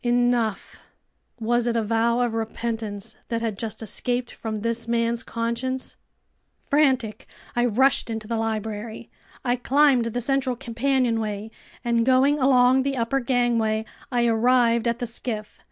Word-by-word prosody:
Enough!" 240 -3 +1 0.6
Was 240 +1 +1
it 235 - 0
a 230 - +1
vow 230 +2 +1
of 240 -2 0
repentance 225 -2 -4
that 230 -1 -2
had 220 -3 -1
just 220 +1 -5
escaped 245 +3 -2
from 215 -2 -5
this 230 +1 -1
man's 235 0 +1
conscience...? 240 +2 -3 0.7
Frantic, 260 -7 +1 0.3
I 240 0 +3
rushed 265 +3 +3
into 220 -1 -4
the 230 0 -1
library. 220 0 -4 0.3
I 245 0 +2
climbed 270 -1 +3
the 230 +1 -2
central 265 0 0
companionway, 230 -4 -1 0.3
and 235 -1 +2
going 265 +4 +4
along 260 -1 +5
the 275 0 -1
upper 235 +3 0
gangway, 235 -3 +1 0.3
I 240 -1 +2
arrived 235 0 +3
at 235 0 +1
the 245 - -3
skiff. 225 -2 -5
235 Hz, 140 wpm, -24 LUFS, 225-250 Hz, 0.7 s, along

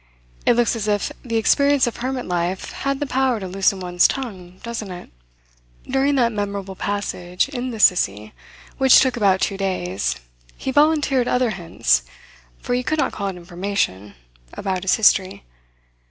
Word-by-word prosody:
It - - +6
looks 240 0 +2
as 215 -2 -3
if 205 -1 0
the 230 -2 -4
experience 280 +4 +3
of 240 - -4
hermit 255 +1 -3
life 180 +1 -2
had 275 0 -2
the 290 - -1
power 265 -3 +1
to 190 - -5
loosen 195 +1 +1
one's 180 -1 +3
tongue, 185 -9 -6
doesn't 230 -3 -5
it? 180 -1 -9 0.8
During 270 +2 +1
that 240 -3 +2
memorable 200 -2 -4
passage, 185 -2 -2
in 255 -2 -4
the 225 -3 -6
Sissie, 105 - +2 0.5
which 265 -1 +7
took 260 -2 +2
about 195 -5 +2
two 195 - 0
days, 180 - -2 0.4
he 265 - -3
volunteered 290 -3 +3
other 250 -2 +1
hints 165 - +1 0.6
for - - -4
you 250 0 0
could 310 +5 -1
not - - +1
call 200 - -3
it 195 - -4
information 175 - -3 0.4
about 190 -2 -2
his 190 -1 +2
history. 190 - +2
205 Hz, 165 wpm, -21 LUFS, 185-250 Hz, 0.8 s, which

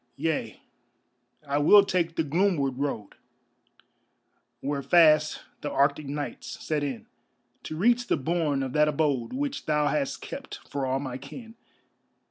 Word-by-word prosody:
Yea, 145 -7 -2 0.9
I 140 +1 +1
will 200 +7 +7
take 170 -4 0
the 160 - +1
gloomward 150 -4 0
road 135 -8 -3 1.5
Where 140 0 -2
fast 155 -1 +4 0.2
the 145 - -3
Arctic 140 +1 +1
nights 145 +1 -5
set 150 -2 0
in, 135 -5 -4 0.6
To 155 - -5
reach 240 +6 +2
the - - +2
bourne 150 -2 0
of 130 -1 -4
that 150 0 +4
abode 145 -5 0
Which 280 +1 -3
thou 150 -1 +2
hast 140 -1 -1
kept - - -7
for 140 -2 -3
all 130 +1 0
my 130 -2 -5
kin. 225 - -10
150 Hz, 140 wpm, -27 LUFS, 140-165 Hz, 1.5 s, will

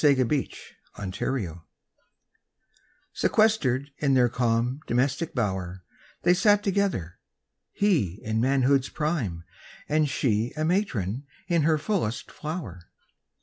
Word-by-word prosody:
DOMESTIC 135 -5 +4
BLISS 105 -7 -5 0.3
IV 80 -2 -8 1.6
Sequestered 145 - +2
in 140 -2 +2
their 125 -2 +4
calm 120 +2 0
domestic 140 +6 0
bower, 95 -5 -2 0.4
They 175 - +5
sat 205 +2 +4
together. 195 - -1 0.5
He 140 - +1
in 110 +1 0
manhood's 135 +1 +2
prime 130 - -2 0.4
And 155 0 +2
she 120 -4 0
a 155 - 0
matron 140 - -1 0.2
in 170 -3 +2
her 155 +1 +3
fullest 155 - -2
flower. 140 - -6
135 Hz, 105 wpm, -26 LUFS, 110-160 Hz, 1.6 s, They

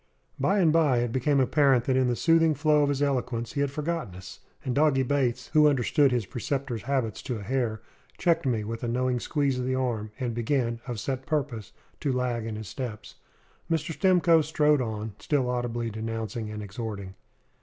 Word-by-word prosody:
By 200 - +2
and 165 -6 +4
by 155 -6 +4
it 120 -1 -1
became 135 +3 +2
apparent 135 -1 +3
that 130 - +1
in 130 -1 +3
the 120 - +1
soothing 165 +2 +3
flow 150 +1 +3
of 145 - +2
his 145 0 0
eloquence 125 -4 -1
he 140 - -1
had 140 - +1
forgotten 150 - -3
us; 95 0 -10 0.3
and 130 - -1
Doggy 140 -2 +3
Bates, 130 -1 0
who 150 -1 +6
understood 140 +1 +3
his 120 -4 0
preceptor's 125 +1 -3
habits 130 -4 -1
to 125 - -4
a 105 - -7
hair, 120 -2 -1 0.3
checked 170 -4 +1
me 115 -4 0
with 115 +2 -5
a - - -1
knowing 125 +1 0
squeeze 140 -1 0
of 125 - -2
the 130 - 0
arm, 120 -5 -1
and 125 -3 -2
began, 120 0 -1
of 120 -3 -4
set 130 +2 -4
purpose, 135 -8 -2 0.3
to 140 - -1
lag 125 -3 -1
in 110 - -4
his 110 -1 -7
steps. 120 -4 -7 0.5
Mr. 165 0 -1
Stimcoe 175 -3 +4
strode 150 -2 +2
on, 110 -2 -4
still 140 -4 0
audibly 120 -2 -2
denouncing 110 0 -4
and 105 0 -6
exhorting. 100 -2 -6
130 Hz, 195 wpm, -27 LUFS, 115-145 Hz, 0.5 s, who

